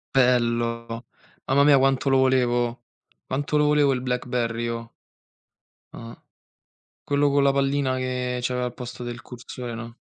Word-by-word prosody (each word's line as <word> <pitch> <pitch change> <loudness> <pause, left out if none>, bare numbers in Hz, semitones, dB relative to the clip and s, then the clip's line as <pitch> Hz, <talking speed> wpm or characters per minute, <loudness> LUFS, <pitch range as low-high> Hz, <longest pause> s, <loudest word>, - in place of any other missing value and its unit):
Bello. 115 -2 +1 0.4
Mamma 140 +2 +4
mia, 140 -2 +6
quanto 135 0 +2
lo 135 - +4
volevo, 120 -2 +1 0.4
quanto 145 +3 -1
lo 150 - +3
volevo 145 -2 +3
il 125 - -2
BlackBerry, 125 -2 -2
io. 115 0 -4 1.0
Ah. 115 0 -10 0.9
Quello 145 0 +2
con 140 0 +3
la 140 - +4
pallina 135 -1 +1
che 125 -1 -2
c'aveva 125 0 -1
al 125 - -5
posto 125 -1 -8
del 120 0 -6
cursore, 120 0 -8
no? 115 +1 -8
125 Hz, 145 wpm, -24 LUFS, 120-135 Hz, 1.0 s, mia